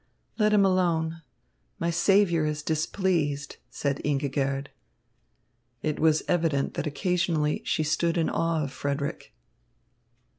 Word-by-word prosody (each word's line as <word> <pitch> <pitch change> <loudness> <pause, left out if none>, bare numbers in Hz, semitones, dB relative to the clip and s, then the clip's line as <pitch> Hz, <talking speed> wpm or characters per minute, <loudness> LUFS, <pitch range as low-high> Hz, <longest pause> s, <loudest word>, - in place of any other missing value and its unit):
"Let 210 0 +4
him 205 -2 +5
alone. 165 -3 +1 0.6
My 170 0 -1
saviour 175 -1 +3
is 150 -1 -2
displeased," 155 -3 -1
said 140 -1 -2
Ingigerd. 140 -1 -1 1.1
It 155 -1 -1
was 155 -1 +3
evident 160 -5 +1
that 150 - -3
occasionally 165 -1 0
she 155 - 0
stood 165 +3 0
in 165 - +2
awe 165 -2 0
of 140 - -4
Frederick. 140 +2 -3
160 Hz, 115 wpm, -27 LUFS, 145-170 Hz, 1.1 s, him